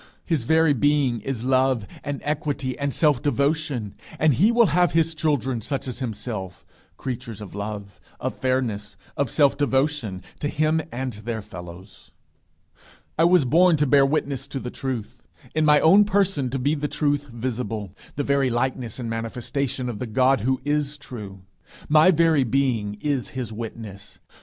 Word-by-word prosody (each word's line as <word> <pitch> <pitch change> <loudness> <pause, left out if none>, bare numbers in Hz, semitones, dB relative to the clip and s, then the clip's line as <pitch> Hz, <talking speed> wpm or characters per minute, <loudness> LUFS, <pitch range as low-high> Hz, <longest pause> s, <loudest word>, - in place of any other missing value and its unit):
His 155 -9 0
very 160 +1 +4
being 140 -2 +2
is 120 0 -4
love 130 -3 +2 0.2
and 145 -1 -4
equity 145 -3 -2
and 140 0 -2
self 145 -3 +2
devotion, 140 -6 0 0.2
and 155 -2 +4
he 200 - +4
will 235 0 +5
have 175 0 +3
his 165 0 +2
children 140 -6 0
such 135 +4 -3
as 125 - -5
himself 110 -6 -5 0.3
creatures 120 -4 -5
of 105 -2 -9
love, 100 -2 -6 0.2
of - - -2
fairness, 115 -6 -2 0.2
of 140 -3 0
self 145 +1 +3
devotion 135 -8 0 0.2
to 145 - -1
him 155 +2 +1
and 130 +1 -3
their 110 +1 -5
fellows. 90 +1 -11 1.1
I 165 - +6
was 175 -4 +5
born 170 +6 +5
to 150 - +2
bear 140 0 +5
witness 140 -1 -1
to 135 - -5
the 125 -1 -6
truth 125 -3 -5 0.3
in 155 0 +2
my 150 -1 +6
own 195 +6 +6
person 195 -9 +1
to 135 - -2
be 140 +4 +1
the 150 -1 -2
truth 145 0 0
visible 115 -5 -4 0.2
the 145 - -1
very 140 -1 +2
likeness 120 -1 -2
and 125 -3 -4
manifestation 125 +3 -3
of 115 -4 -4
the 125 - -4
God 130 +4 +3
who 130 +3 +1
is 145 0 0
true. 100 -9 -9 0.4
My 155 +4 +6
very 165 -4 +4
being 120 -5 0
is 140 -4 -1
his 120 -4 -4
witness. 110 -3 -8
130 Hz, 165 wpm, -24 LUFS, 115-150 Hz, 1.1 s, I